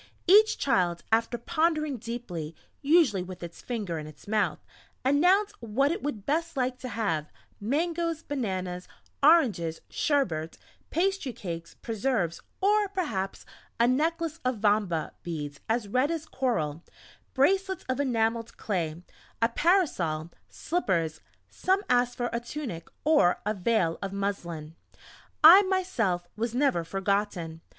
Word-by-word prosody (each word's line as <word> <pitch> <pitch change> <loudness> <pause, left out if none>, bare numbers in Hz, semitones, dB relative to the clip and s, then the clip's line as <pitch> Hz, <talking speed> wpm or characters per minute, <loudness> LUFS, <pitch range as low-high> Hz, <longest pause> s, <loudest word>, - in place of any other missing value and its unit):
Each 425 +4 +6
child, 175 -9 +1
after 230 +2 +2
pondering 310 +1 0
deeply 205 -9 -6 0.3
usually 285 - +4
with 180 0 -8
its 170 0 -8
finger 205 -9 -3
in 155 - -7
its 155 - -14
mouth 205 -7 +1 0.5
announced 365 +10 +4
what 245 +6 +1
it 360 - -3
would 225 -9 -4
best 330 +1 -1
like 255 0 -1
to 255 - -6
have; 200 -9 -2 0.3
mangoes, 330 +7 -1
bananas, 185 -10 -3 0.3
oranges, 240 - +4
sherbet, 175 - 0 0.3
pastry 380 -5 0
cakes, 170 -4 -7
preserves, 220 -7 -1 0.2
or 415 +1 +3
perhaps 235 - -3 0.3
a 235 - +5
necklace 325 +4 0
of 255 -2 0
"vamba" 205 -6 +1
beads 150 -4 -5
as 225 -1 0
red 255 +7 +2
as 330 -1 -3
coral, 170 - -1 0.5
bracelets 380 +7 +2
of 255 +1 -1
enamelled 230 -3 0
clay 170 -4 -2 0.4
a 230 - +3
parasol 210 - +1 0.2
slippers; 170 - -1 0.3
some 380 +2 0
asked 245 0 +2
for 240 -1 -2
a 235 - 0
tunic, 240 - -6 0.2
or 295 - +4
a 210 - +1
veil 185 -4 +1
of 195 - -3
muslin.... 175 -6 -4 0.7
I, 345 +6 +11
myself 315 - 0
was 230 +2 -2
never 260 -11 +2
forgotten. 195 -3 -2
230 Hz, 130 wpm, -28 LUFS, -, 0.7 s, I